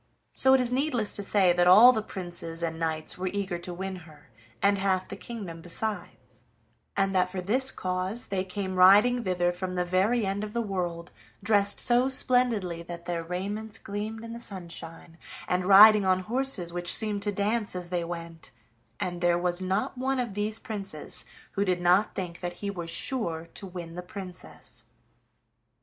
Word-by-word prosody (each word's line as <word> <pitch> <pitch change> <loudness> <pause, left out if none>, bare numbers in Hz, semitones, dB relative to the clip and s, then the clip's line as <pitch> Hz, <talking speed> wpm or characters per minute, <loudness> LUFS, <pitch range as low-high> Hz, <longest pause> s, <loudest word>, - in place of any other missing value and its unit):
So 265 0 +5
it - - +3
is 245 -1 -1
needless 250 -5 0
to - - 0
say 195 -3 +3
that 175 0 +3
all 215 +8 +9
the 220 -3 -1
princes 175 -4 -5
and 165 -1 -3
knights 160 0 -3
were 185 - -2
eager 190 -2 -3
to 175 +1 -5
win 190 +1 -5
her, 155 -7 -16 0.3
and 200 0 +2
half 190 -1 0
the - - -7
kingdom 195 -9 -8
besides, 205 +5 -5 0.6
and 195 0 +2
that 185 -1 +2
for 185 0 -5
this 250 +9 +2
cause 185 +4 -2
they 190 -1 -2
came 190 0 -4
riding 210 +7 +6
thither 180 -2 +1
from 180 +1 -5
the 180 0 0
very 195 +6 +1
end 195 +2 -2
of 210 0 -6
the 235 - -1
world, 175 -5 -4 0.3
dressed 205 -1 +3
so 245 +2 +3
splendidly 240 -10 +1
that 170 0 -8
their 170 -1 -3
raiments 205 +5 -5
gleamed 215 +2 -5
in 230 0 -7
the 235 - -7
sunshine, 170 -5 -8 0.3
and 180 0 0
riding 205 +2 +9
on 185 -1 +2
horses 220 -5 -1
which 175 0 0
seemed 210 -2 -1
to 205 - -1
dance 205 +1 -1
as 180 -1 -5
they 175 -1 -1
went, 170 -1 -7 0.5
and 175 -1 -3
there 175 0 +3
was 175 +1 0
not 190 +7 -2
one 265 +1 0
of 240 -5 -2
these 210 +2 -2
princes 195 -9 -4 0.3
who 200 - 0
did 180 -2 0
not 180 +4 +3
think 175 -3 -5
that 175 -1 -4
he 200 +3 -5
was 170 -4 -6
sure 170 - -1
to 195 - -7
win 175 -2 -8
the 180 - -5
Princess. 180 0 -9
190 Hz, 185 wpm, -27 LUFS, 175-215 Hz, 0.6 s, all